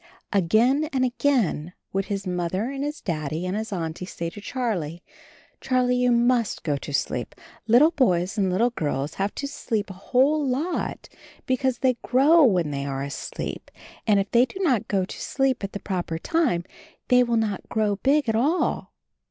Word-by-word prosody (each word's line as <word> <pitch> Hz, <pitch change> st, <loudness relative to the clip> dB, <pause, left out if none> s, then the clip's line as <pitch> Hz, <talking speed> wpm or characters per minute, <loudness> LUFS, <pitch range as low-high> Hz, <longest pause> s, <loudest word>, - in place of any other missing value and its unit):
Again 225 Hz, -, +3 dB
and 260 Hz, -1 st, +1 dB
again 240 Hz, -, 0 dB, 0.2 s
would 195 Hz, 0 st, 0 dB
his 200 Hz, -1 st, -3 dB
Mother 185 Hz, +6 st, -2 dB
and 275 Hz, 0 st, -4 dB
his 295 Hz, +2 st, -4 dB
Daddy 155 Hz, 0 st, -3 dB
and 185 Hz, +2 st, -2 dB
his 220 Hz, +1 st, -4 dB
Auntie 170 Hz, -1 st, -4 dB
say 170 Hz, -3 st, -5 dB
to 205 Hz, -, -10 dB
Charlie, 195 Hz, -, -3 dB, 0.6 s
"Charlie, 250 Hz, -1 st, +1 dB
you 250 Hz, 0 st, +3 dB
must 240 Hz, -1 st, +2 dB
go 150 Hz, -3 st, 0 dB
to 140 Hz, -, -6 dB
sleep. 125 Hz, -3 st, -2 dB, 0.3 s
Little 255 Hz, +8 st, +6 dB
boys 185 Hz, -, +1 dB
and 195 Hz, -3 st, +1 dB
little 230 Hz, +7 st, +2 dB
girls 145 Hz, -, -2 dB
have 200 Hz, +1 st, -1 dB
to 280 Hz, -, -3 dB
sleep 220 Hz, -7 st, -3 dB
a -, -, -7 dB
whole 265 Hz, +10 st, +2 dB
lot, 280 Hz, +7 st, -2 dB, 0.4 s
be 260 Hz, -, +2 dB
cause 260 Hz, -1 st, 0 dB
they 255 Hz, -2 st, +1 dB
grow 295 Hz, +7 st, +5 dB
when 180 Hz, -, +3 dB
they 140 Hz, -1 st, -3 dB
are 135 Hz, -1 st, -3 dB
asleep, 140 Hz, -, -6 dB, 0.4 s
and 205 Hz, -2 st, +5 dB
if 195 Hz, 0 st, -2 dB
they 240 Hz, +1 st, +5 dB
do 380 Hz, -, -10 dB
not 250 Hz, -, +1 dB
go 190 Hz, -2 st, +1 dB
to -, -, -9 dB
sleep 270 Hz, -5 st, 0 dB
at 195 Hz, -, -3 dB
the 200 Hz, -, -5 dB
proper 180 Hz, -5 st, -3 dB
time 275 Hz, -, 0 dB, 0.5 s
they 250 Hz, 0 st, +6 dB
will 235 Hz, -1 st, +2 dB
not 215 Hz, -3 st, -2 dB
grow 210 Hz, -2 st, 0 dB
big 280 Hz, +5 st, +2 dB
at 225 Hz, -, +2 dB
all." 295 Hz, +10 st, 0 dB
220 Hz, 185 wpm, -24 LUFS, 180-255 Hz, 0.6 s, Little